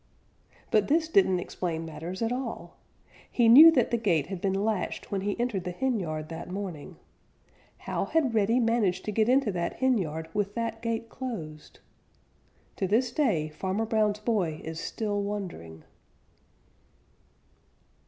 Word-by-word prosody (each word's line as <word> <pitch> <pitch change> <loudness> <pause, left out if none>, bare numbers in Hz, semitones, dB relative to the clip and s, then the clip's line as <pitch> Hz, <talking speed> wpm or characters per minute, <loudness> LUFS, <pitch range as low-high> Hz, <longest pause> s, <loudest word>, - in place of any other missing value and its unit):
But 210 -2 +3
this 320 +2 +2
didn't 320 - +3
explain 165 -2 -4
matters 165 +6 -6
at 225 - 0
all. 235 -9 -5 0.6
He 240 -2 +3
knew 290 +8 +11
that - - +2
the 235 - +1
gate 170 -10 +1
had 185 0 -6
been 195 +1 0
latched 215 -5 -2
when 195 -1 -1
he 205 +3 -2
entered 235 -6 -1
the 180 - -4
henyard 175 -9 -2
that 165 +2 -7
morning. 185 -6 -6 0.8
How - - -3
had 300 -7 +1
Reddy 225 +3 +3
managed 225 -6 +1
to 215 - -2
get 220 +2 +2
into 260 -4 +3
that 170 -2 -3
henyard 180 -12 0
with 205 -1 -2
that 230 -1 -3
gate 230 0 -2
closed? 175 - -7 1.0
To 190 - 0
this 230 +5 +2
day, 215 - +1
Farmer 190 +7 -2
Brown's 215 -2 +1
boy 195 -9 0
is 160 0 -6
still 205 +1 -2
wondering. 180 - -6
205 Hz, 145 wpm, -28 LUFS, 175-230 Hz, 1.0 s, knew